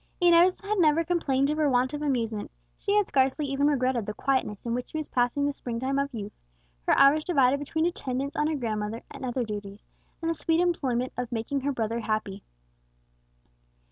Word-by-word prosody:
Inez 350 +1 +5
had 415 0 -1
never 320 -1 +4
complained 295 -5 +1
of 305 - -2
want 260 -3 +2
of 295 - -4
amusement; 230 -7 -1 0.3
she 405 0 -1
had 415 - +3
scarcely 270 +2 +1
even 275 +1 +1
regretted 255 -6 +1
the 210 - -4
quietness 260 -7 -1
in 235 - -1
which 245 +1 -3
she - - -5
was 310 - -3
passing 250 +3 +1
the 285 - 0
spring 240 -4 -5
time 270 +2 0
of 280 0 -1
youth, 210 -4 -6 0.5
her - - +4
hours 285 +3 +6
divided 280 -6 +3
between 315 +3 -1
attendance 275 -5 -3
on 300 - +1
her 315 - 0
grandmother 220 -3 -3
and - - -9
other 250 0 -1
duties, 205 -2 -7 0.3
and 330 0 -1
the - - +1
sweet 325 0 0
employment 260 -8 0
of 250 -1 -3
making 240 +4 -2
her 285 +2 0
brother 230 -2 -2
happy. 215 -3 -2
270 Hz, 195 wpm, -27 LUFS, 235-300 Hz, 0.5 s, hours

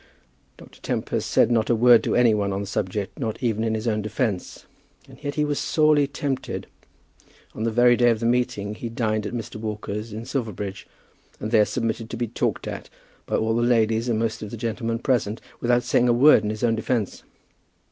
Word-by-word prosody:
Dr. - - -16
Tempest - - -2
said 120 - +3
not 110 -2 +2
a 120 - +4
word 120 +1 +6
to - - 0
any 120 -2 +5
one 100 -2 0
on 95 +1 -2
the - - -4
subject, 100 0 -3
not 115 -5 -2
even 110 -2 0
in 110 -1 0
his 110 +2 -3
own 110 -1 +1
defence. 105 -2 -3 0.4
And - - -16
yet 145 -1 -3
he 150 - +1
was 145 -1 -1
sorely 150 -2 +3
tempted. 140 -1 -4 0.9
On 110 - -3
the - - +2
very 120 +2 +5
day 120 0 +4
of 115 -2 +1
the 115 - -3
meeting 120 -4 0
he 115 +2 -6
dined 110 -2 -1
at - - -7
Mr. 115 -2 -6
Walker's 105 0 -5
in 110 +2 -6
Silverbridge, 105 -7 -4 0.5
and 110 - -4
there 110 -3 +5
submitted 115 -1 -3
to 120 - -5
be 120 - -1
talked - - -2
at - - -6 0.4
by - - -1
all 110 0 +1
the 120 - +1
ladies 115 -1 +2
and 115 - +1
most 115 0 -2
of 105 - -6
the 115 - -7
gentlemen 115 0 -2
present, 115 -3 0 0.2
without 120 0 +2
saying 125 0 +2
a - - +5
word 130 0 +6
in 105 - -1
his 110 +1 -4
own 115 -1 +3
defence. 115 -1 -2
115 Hz, 210 wpm, -24 LUFS, 110-120 Hz, 0.9 s, word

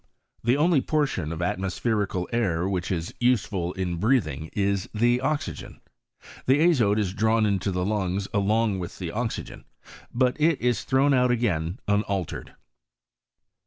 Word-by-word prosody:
The 120 +4 +3
only 155 -1 +3
portion 135 - -1
of 85 +1 -3
atmospherical 95 0 -1
air 95 -7 0
which 95 -2 -2
is 85 -2 -3
useful 105 -8 +1
in 90 -2 -3
breathing 85 - 0
is 100 -2 0
the 120 +3 +2
oxygen. 150 +2 -3 0.7
The 135 +3 +4
azote 130 -12 +3
is 100 -4 0
drawn 110 +2 +2
into 100 -1 0
the 90 0 -1
lungs 100 -2 -1
along 105 0 +1
with 90 - -6
the 85 -3 -5
oxygen, 115 +3 -4 0.5
but 125 +3 +1
it 160 -1 +3
is 120 -1 0
thrown 135 +2 +3
out 125 -1 +3
again 95 -8 0
unaltered. 100 -3 -2
105 Hz, 140 wpm, -25 LUFS, 90-125 Hz, 0.7 s, The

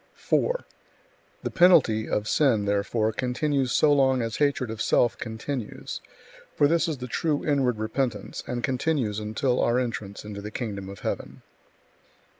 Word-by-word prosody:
4. - - 0 0.8
The - - -2
penalty 145 -12 +5
[of 105 0 -1
sin], 120 -8 +3
therefore, 105 +2 +1
continues 130 +4 0
so 150 -1 +4
long 130 -3 +3
as 115 -1 -3
hatred 140 -5 +1
of 110 0 -5
self 120 +1 +3
continues; 115 +1 -5 0.5
for 145 - +4
this 170 +3 +2
is 155 -3 -2
the 125 - -6
true 145 +4 -1
inward 135 -6 +2
repentance, 110 +1 -2
and 120 -1 -3
continues 130 -5 0
until 110 +4 0
our 120 +1 +2
entrance 110 -5 -3
into 100 -1 -6
the 105 - -6
kingdom 100 -4 -5
of 100 -2 -10
heaven. - - -4
120 Hz, 150 wpm, -26 LUFS, 110-140 Hz, 0.8 s, penalty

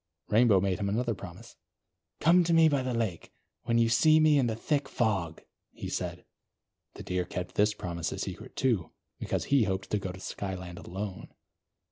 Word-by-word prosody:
Rainbow 110 -2 +5
made 95 +1 0
him 100 -1 -1
another 115 +3 0
promise. 100 - -11 0.6
"Come 175 +3 +5
to 170 0 +2
me 165 -1 +7
by 145 -3 +2
the 130 -1 -2
lake, 110 -8 -2 0.4
when 115 -1 +2
you 115 0 +4
see 155 +8 +5
me 155 -2 +5
in 125 - +2
the 110 - -1
thick 145 +4 -1
fog," 95 -10 -1 0.3
he - - -6
said. - - -4 0.7
The - - -8
Deer 90 0 -1
kept 90 0 -6
this 105 +1 +2
promise 85 -4 -4
a - - -5
secret, - - -6
too; 115 -10 +1 0.3
because - - -2
he 135 -6 +5
hoped 95 0 -3
to 105 - +1
go 95 -2 -4
to 95 - -11
Skyland 95 -2 -6
alone. 95 +1 -6
105 Hz, 185 wpm, -29 LUFS, 95-130 Hz, 0.7 s, me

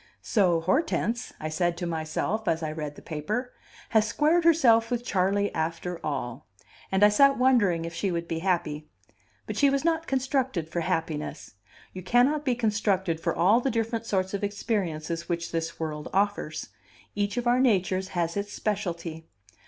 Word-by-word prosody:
"So 180 -6 +2
Hortense," 230 - 0
I 155 - -3
said 170 +2 0
to 175 - -3
myself 170 +6 -2
as 165 -1 +1
I 155 - -2
read 150 -2 -5
the - - -13
paper, 210 - -3 0.4
"has 220 -1 +3
squared 320 +8 +2
herself 235 -9 +5
with 245 0 -2
Charley 200 +1 +1
after 165 +2 -3
all." 130 -5 -4 0.4
And 190 +1 +3
I 210 - +8
sat 275 +6 +5
wondering 210 -10 +3
if 165 - -6
she 190 +4 -1
would 170 -1 -2
be 165 -1 -2
happy. 165 -4 -1 0.6
But - - -5
she 280 - +5
was 275 +2 0
not 330 0 +1
constructed 260 - 0
for 170 - -3
happiness. 165 -7 -3 0.4
You 185 - -6
cannot 265 - +2
be 255 -3 +2
constructed 205 -7 0
for - - -1
all 200 +8 +4
the 270 - 0
different 230 -1 -2
sorts 190 -2 0
of 200 - -3
experiences 175 -6 -2
which 170 -1 -2
this 165 0 -3
world 155 -2 -4
offers: 200 -6 -1 0.4
each 205 +1 -1
of 245 - -1
our 240 +1 +3
natures 190 -6 +2
has 170 -1 0
its 205 0 -3
specialty. 170 -6 -3
190 Hz, 170 wpm, -27 LUFS, 165-230 Hz, 0.6 s, I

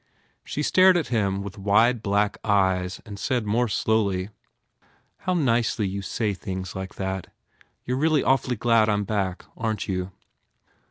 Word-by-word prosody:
She 150 - -3
stared 185 +3 +5
at 165 - -2
him 100 -5 0
with 100 +1 -8
wide 110 +4 +3
black 105 0 0
eyes 95 -3 +1
and 100 -2 -8
said 125 -4 -1
more 115 +4 +1
slowly, 100 -3 0 1.0
"How 185 - +2
nicely 115 - +1
you 100 +1 -4
say 105 +2 -1
things 95 -1 -6
like 95 0 -6
that. 95 -1 -3 0.6
You 125 - -1
re 135 - -2
really 155 -2 +3
awfully 130 -1 +2
glad 115 -1 +3
I - - +3
m 105 0 0
back, 95 -3 -2
aren 110 -1 -2
t 95 - -4
you?" 90 +1 -3
105 Hz, 165 wpm, -25 LUFS, 95-120 Hz, 1.0 s, stared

